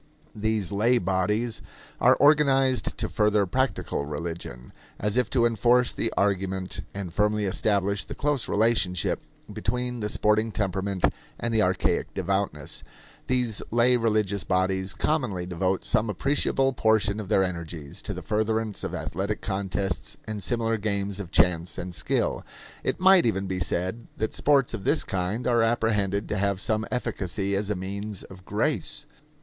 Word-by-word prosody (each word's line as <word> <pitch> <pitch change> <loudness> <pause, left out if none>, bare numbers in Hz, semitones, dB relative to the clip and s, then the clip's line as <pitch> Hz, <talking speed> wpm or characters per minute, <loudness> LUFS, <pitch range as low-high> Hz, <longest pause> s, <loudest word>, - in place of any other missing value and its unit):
These 110 -3 -1
lay 115 +5 +3
bodies 105 +5 0 0.4
are - - +6
organized 135 -4 +3
to - - 0
further 105 -1 +2
"practical" 130 - -1
religion; 75 -5 -6 0.2
and - - -6
as 105 - 0
if 125 0 +2
to 120 -3 +3
enforce 120 +2 +3
the 115 - -1
argument 95 -2 0
and 95 -4 -6
firmly 105 +2 +1
establish 100 +1 +1
the - - -8
close 145 -3 0
relationship 100 -5 +2 0.3
between 125 +1 -2
the 105 -1 -2
sporting 105 +2 +2
temperament 95 -2 -1 0.3
and 120 -1 -2
the 110 - +3
archaic 95 -2 0
devoutness, 95 -7 -2 0.5
these 125 -4 0
lay 120 +2 +4
religious 110 -4 +1
bodies 95 +1 0
commonly 125 - 0
devote 90 +1 -1
some 110 - +2
appreciable 135 +4 +1
portion 110 -3 +2
of 100 -3 -6
their 95 - +4
energies 85 -5 -5
to - - -5
the - - -7
furtherance 110 0 -1
of - - -3
athletic 100 +5 -3
contests 95 -1 -2
and 110 -1 -5
similar 115 0 0
games 100 -1 -1
of 95 -4 -6
chance 90 -2 +2
and 90 0 -5
skill. 75 -2 0 0.4
It - - -1
might 185 -5 +6
even 100 -3 0
be 95 -1 -3
said 95 +6 -2
that 110 - -2
sports 140 -4 +3
of 110 -4 -5
this - - +3
kind 95 +6 -2
are 120 -2 +3
apprehended 105 -3 +1
to 105 - -1
have 100 -1 0
some 110 +1 0
efficacy 100 -5 -2
as 100 +1 -1
a 105 - 0
means 100 +2 -5
of 95 -1 -13
grace. - - -1
105 Hz, 155 wpm, -26 LUFS, 95-115 Hz, 0.5 s, are